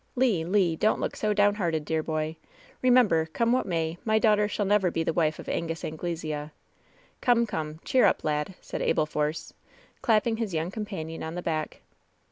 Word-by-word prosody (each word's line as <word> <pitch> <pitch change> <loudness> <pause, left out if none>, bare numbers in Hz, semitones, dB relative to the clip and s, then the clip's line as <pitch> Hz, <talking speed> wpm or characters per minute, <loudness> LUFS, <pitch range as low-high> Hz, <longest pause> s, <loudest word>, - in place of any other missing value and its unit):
*^Le! 235 -10 +2
Le 185 0 +2
I - - -2
donH 215 - +2
look - - -3
so 215 - 0
down 205 0 +4
hearted, 165 -7 -1
dear 160 0 0
boy! 155 0 -2 0.5
Re 255 - +3
member, 215 -11 +4
come 230 +9 0
what 255 -3 +1
may, 165 -1 -2
my 220 -1 +2
daughter 210 -2 +3
shall 205 0 -2
never 195 -2 +3
be 165 -1 -1
the 165 - -1
wife 155 -2 +1
of - - -10
Angus 165 0 -3
Anglesea! 155 -2 -4 0.7
Come, 235 -1 +4
come, 155 -6 -4
cheer 255 - +4
up, - - +2
lad 150 +4 -1
!" - - -31
said - - -5
Abel 155 - +2
Force, 150 +1 -3 0.5
clapping 225 0 +2
his 215 -6 -3
young 160 +3 -1
companion 195 -7 -5
on 160 +1 -5
the 180 - -4
back. 155 -2 -3
170 Hz, 200 wpm, -27 LUFS, 160-210 Hz, 0.7 s, down